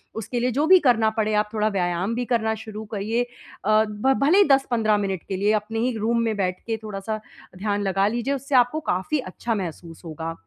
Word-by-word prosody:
उसके 225 +3 -3
लिए 250 +1 +1
जो 285 +6 +1
भी 375 +1 +8
करना 225 -3 +4
पड़े, 215 -1 +1
आप 210 0 +1
थोड़ा 215 -1 +1
व्यायाम 185 +1 -1
भी 245 +1 -2
करना 230 -2 +1
शुरू 220 0 -8
करिए। 215 +4 -1
अ, 215 -3 -1
भ 210 +6 +1
भले 315 +7 +5
ही 405 - +8
10-15 240 -6 +3
मिनट 195 -3 -2
के 195 - -3
लिए, 205 +2 +2
अपने 215 +1 -2
ही 240 +3 +1
एक 235 - -4
रूम 230 +2 +1
में 225 -1 0
बैठ 185 -2 -1
के 225 -1 -1
थोड़ा-सा 215 +1 -4 0.4
ध्यान 205 +1 -1
लगा 195 0 +2
लीजिए, 240 +5 -1
उससे 275 0 -2
आपको 245 +5 +4
काफ़ी 235 - 0
अच्छा 230 +1 -3
महसूस 170 -3 -6
होगा। 165 0 -5
220 Hz, 220 wpm, -24 LUFS, 200-240 Hz, 0.4 s, भी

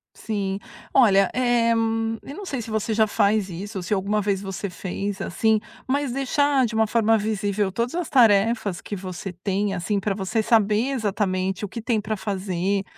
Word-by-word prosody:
Sim. 200 -3 -3 0.3
Olha, 195 -7 +5
eh, 240 -2 +2
eu 230 - +3 0.6
não 405 - -7
sei 270 -8 -3
se 225 - -8
você 220 +1 -1
já 220 0 +4
faz 205 -1 +1
isso 195 +4 -6
ou 180 - -4
se 210 - -1
alguma 205 +2 0
vez 200 -1 0
você 195 0 -4
fez, 190 +2 -4
assim, 220 +4 +2 0.3
mas 280 -1 0
deixar 275 0 +2
de 225 - -4
uma 220 0 +2
forma 225 0 +3
visível 205 -2 -1
todas 235 - -2
as 350 -1 -2
tarefas 220 -6 +3
que 205 - -5
você 185 0 -6
tem, 195 +3 -1
assim, 195 +3 -1
pra 195 0 -1
você 215 +3 -1
saber 220 +2 +2
exatamente 195 -5 -1
o 205 - -3
que 230 - -6
tem 225 -2 0
para 215 0 -3
fazer 195 0 -1
210 Hz, 185 wpm, -24 LUFS, 195-230 Hz, 0.6 s, Olha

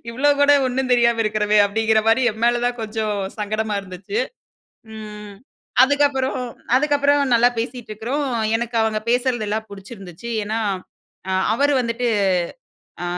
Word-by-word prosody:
இவ்ளோ 265 +5 +1
கூட 285 0 +6
ஒண்ணும் 255 0 -2
தெரியாம 235 -1 +3
இருக்கிறோமே. 210 0 +1
அப்டிங்கிற 220 +1 +2
மாரி 230 +3 +4
என் 220 - -12
மேல 240 0 +3
தான் 245 0 -1
கொஞ்சம் 215 -1 -2 0.2
சங்கடமா 215 0 -2
இருந்துச்சு. 195 +3 -6 0.8
ம், 210 -1 -9 0.5
அதுக்கப்புறம் 275 -1 +2 0.4
அதுக்கப்புறம் 285 0 +2
நல்லா 240 +1 +5
பேசிட்டுருக்கிறோம். 240 +3 -3 0.3
எனக்கு 235 0 -4
அவங்க 220 -1 0
பேசுறதெல்லாம் 220 -4 0
புடிச்சிருந்துச்சு. 195 0 -10 0.2
ஏனா, 220 +2 -2 0.7
அ - - 0 0.2
அவர் 285 +5 +2
வந்துட்டு, 235 0 -1 0.9
அ - - -3
230 Hz, 125 wpm, -21 LUFS, 215-255 Hz, 0.9 s, கூட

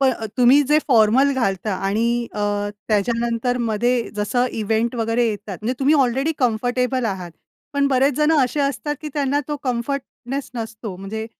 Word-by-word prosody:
प 275 - +3
अ, 235 -4 +1
तुम्ही 255 +3 +6
जे 300 +1 +5
फॉर्मल 250 +3 +4
घालता 195 -5 -1
आणि 210 +4 +1 0.3
अ, 210 - -3 0.5
त्याच्यानंतर 230 +3 0
मध्ये 235 +2 +1
जसं 245 +5 +1
इव्हेंट 225 +3 0
वगैरे 230 +1 +1
येतात, 205 -3 -5
म्हणजे 240 +4 -1
तुम्ही 280 +3 +3
ऑलरेडी 270 +2 +2
कम्फर्टेबल 250 +1 0
आहात. 190 -5 -3 0.4
पण 280 0 +2
बरेच 270 +1 +2
जणं 300 -2 +4
असे 270 +4 -2
असतात, 285 +1 -1
की 310 - -5
त्यांना 285 -1 +1
तो 295 - -2
कम्फर्टनेस 265 +1 -4
नसतो. 220 -4 -6
म्हणजे 210 +4 -5
245 Hz, 160 wpm, -21 LUFS, 220-275 Hz, 0.5 s, तुम्ही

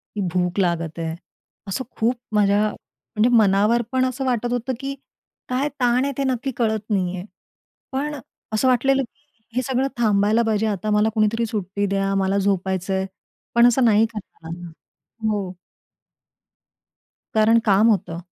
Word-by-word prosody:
की 210 - -2
भूक 180 +1 0
लागत 170 -3 -1
आहे. 160 0 -3 0.5
असं 200 +7 -2
खूप 235 +3 +2 0.2
माझ्या 205 0 +4
म्हणजे 225 +2 -3
मनावर 210 +3 +4
पण 260 0 +2
असं 255 +1 -2
वाटत 240 -2 0
होतं, 245 +2 -1
की 275 0 -4 0.6
काय 265 +4 0
ताण 245 0 +3
आहे, 280 - -1
ते 275 - 0
नक्की 265 0 -1
कळत 220 -2 +1
नाही 185 -3 0
आहे. 180 0 -6 0.7
पण 290 +3 -2
अ, 285 - -7 0.3
असं 220 +4 +2
वाटलेलं 270 +2 +3
की 235 - -12 0.4
हे 255 - +2
सगळं 260 +1 0
थांबायला 215 0 +3
पाहिजे 220 0 +1
आता 210 0 -2
मला 210 +1 +3
कुणीतरी 225 +1 +1
सुट्टी 200 -2 -2
द्या. 195 0 0
मला 195 0 +1
झोपायचं 190 -1 0
आहे, 190 0 0 0.5
पण 235 0 +6
असं 250 +2 +3
नाही 225 -1 +5
करता 190 -5 -10
आलं. 175 +1 -7 0.6
हो. 200 -4 -2 1.8
कारण 220 +1 +5
काम 210 +2 +5
होतं. 170 -4 -1
215 Hz, 155 wpm, -22 LUFS, 195-245 Hz, 1.8 s, पण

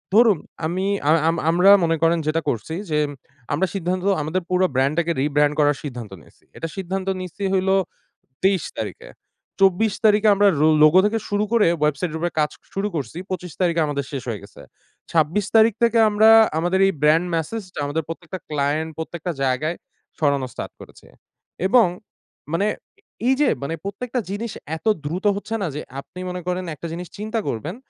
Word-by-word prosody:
ধরুন, 220 -4 +6 0.3
আমি 180 +4 -1 0.2
আম 155 - +6
আম 165 - +1
আমরা 180 +4 +6
মনে 165 -1 +2
করেন 165 +1 +3
যেটা 160 +1 +1
করছি 120 +8 -3 0.2
যে, 150 - +2 0.5
আমরা 180 +6 +1
সিদ্ধান্ত 185 0 -2 0.2
আমাদের 155 +5 -1
পুরো 185 0 +3
ব্র্যান্ডটাকে 155 +6 +1
রিব্র্যান্ড 145 +1 +2
করার 145 -1 +3
সিদ্ধান্ত 125 -7 -7
নিছি। - - -23
এটা 165 - -4
সিদ্ধান্ত 190 0 -3
নিছি 185 +2 -7
হইলো 190 0 +2 0.7
২৩ 190 -1 +3
তারিখে। - - -6 0.5
২৪ 195 +2 +4
তারিখে 215 0 +5
আমরা 205 +1 +4
রো 155 - +5 0.2
লোগো 155 +4 +7
থেকে 215 +2 +1
শুরু 205 0 +1
করে 225 -5 +4
ওয়েবসাইটের 150 +2 0
উপরে 175 +1 -1
কাজ 150 -1 +1 0.2
শুরু 195 +1 -1
করছি। 145 0 -4
২৫ 180 -3 -5
তারিখে 170 -2 +2
আমাদের 140 -1 -2
শেষ 135 -3 -4
হয়ে 110 -4 -4
গেছে। 100 - -14 0.5
২৬ 165 +5 +2
তারিখ 225 0 +6
থেকে 235 0 +3
আমরা 215 +1 +5 0.3
আমাদের 175 +3 +1
এই 195 - +1
ব্র্যান্ড 160 +4 +4
মেসেজটা 185 +3 -4
আমাদের 150 +3 -2
প্রত্যেকটা 175 +3 -7
ক্লায়েন্ট, 150 +2 0
প্রত্যেকটা 165 +2 -4
জায়গায় 135 +6 0 0.4
ছড়ানো 140 -3 +1
স্টার্ট - - -7
করেছি। - - -15 0.6
এবং 235 +3 +6 0.7
মানে 195 +5 +1 0.6
এইযে 265 +2 +3 0.2
মানে 140 - -3
প্রত্যেকটা 240 +5 -3
জিনিস 215 +3 -4 0.3
এত 160 - -22 0.2
দ্রুত 175 +7 -4
হচ্ছে 215 +3 -4
না 195 - 0
যে 150 - -3 0.2
আপনি 180 - -11
মনে 180 0 -5
করেন 180 0 -2
একটা 170 - -7
জিনিস 175 +1 -6
চিন্তা 215 +2 -2
করবেন, 150 - -4
175 Hz, 170 wpm, -22 LUFS, 150-195 Hz, 0.7 s, লোগো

